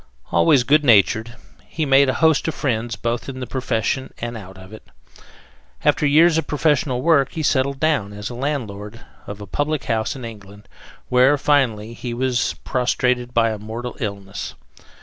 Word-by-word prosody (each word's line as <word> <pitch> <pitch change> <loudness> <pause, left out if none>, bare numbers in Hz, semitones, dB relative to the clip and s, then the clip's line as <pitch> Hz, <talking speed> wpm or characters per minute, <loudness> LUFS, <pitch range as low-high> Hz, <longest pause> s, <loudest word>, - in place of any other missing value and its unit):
Always 85 - +4
good 150 +4 +3
natured, 115 -1 +3 0.3
he 160 - -2
made 135 0 +5
a 130 - 0
host 160 -1 +3
of 160 - -2
friends 115 -3 -2
both 120 +3 -3
in 130 -1 -7
the 125 - -4
profession 130 0 -2
and 120 0 -5
out 95 -3 -10
of 95 +2 -13
it. 110 - -10 1.0
After 150 - +3
years 160 +3 +5
of - - -5
professional 145 -4 0
work 145 -5 +3
he 160 - -3
settled 140 -1 +1
down 145 -10 +1
as 105 +2 -6
landlord 115 -5 -4 0.3
of 100 0 -7
a - - -6
public 145 +8 -2
house 110 +4 -1
in 130 -3 -7
England, 100 -2 -11 0.4
where, 130 +3 +4
finally, 120 -7 +1
he 120 0 -6
was 125 -1 0
prostrated 125 -1 0
by 115 -1 +3
a 110 - -5
mortal 115 +4 -6
illness. 100 -3 -5
125 Hz, 170 wpm, -21 LUFS, 110-140 Hz, 1.0 s, made